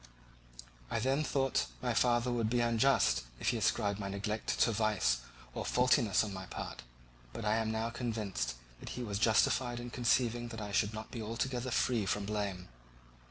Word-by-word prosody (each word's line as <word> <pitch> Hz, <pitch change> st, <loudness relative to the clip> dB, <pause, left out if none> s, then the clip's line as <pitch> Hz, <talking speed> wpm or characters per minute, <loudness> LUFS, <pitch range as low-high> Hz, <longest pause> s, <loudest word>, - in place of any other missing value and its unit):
I -, -, -1 dB
then 135 Hz, +6 st, +1 dB
thought 135 Hz, -2 st, 0 dB
that -, -, +2 dB, 0.2 s
my 120 Hz, -1 st, +1 dB
father 120 Hz, +1 st, +2 dB
would 115 Hz, -2 st, 0 dB
be 120 Hz, +1 st, +1 dB
unjust 115 Hz, -, +3 dB, 0.2 s
if -, -, +1 dB
he -, -, +1 dB
ascribed 100 Hz, -1 st, +1 dB
my 100 Hz, -1 st, -3 dB
neglect 105 Hz, +2 st, -2 dB
to 115 Hz, -, +5 dB
vice 105 Hz, -, +2 dB, 0.4 s
or -, -, -3 dB
faultiness 125 Hz, -5 st, +3 dB
on 105 Hz, -2 st, -4 dB
my 95 Hz, -1 st, -7 dB
part, 60 Hz, -, -6 dB, 0.5 s
but 115 Hz, -, -5 dB
I 105 Hz, +1 st, +3 dB
am 110 Hz, -1 st, 0 dB
now 110 Hz, +1 st, -1 dB
convinced 105 Hz, -, -2 dB, 0.2 s
that -, -, -8 dB
he 125 Hz, -, -3 dB
was 100 Hz, -3 st, -3 dB
justified 120 Hz, +2 st, +3 dB
in 120 Hz, 0 st, -7 dB
conceiving 120 Hz, -1 st, +1 dB
that 115 Hz, -1 st, -7 dB
I 105 Hz, -1 st, -5 dB
should 105 Hz, +1 st, +1 dB
not 110 Hz, 0 st, -7 dB
be 115 Hz, -, -5 dB
altogether 120 Hz, +3 st, -2 dB
free 115 Hz, -4 st, +1 dB
from 100 Hz, +1 st, 0 dB
blame. 100 Hz, -3 st, -3 dB
110 Hz, 185 wpm, -33 LUFS, 105-120 Hz, 0.5 s, to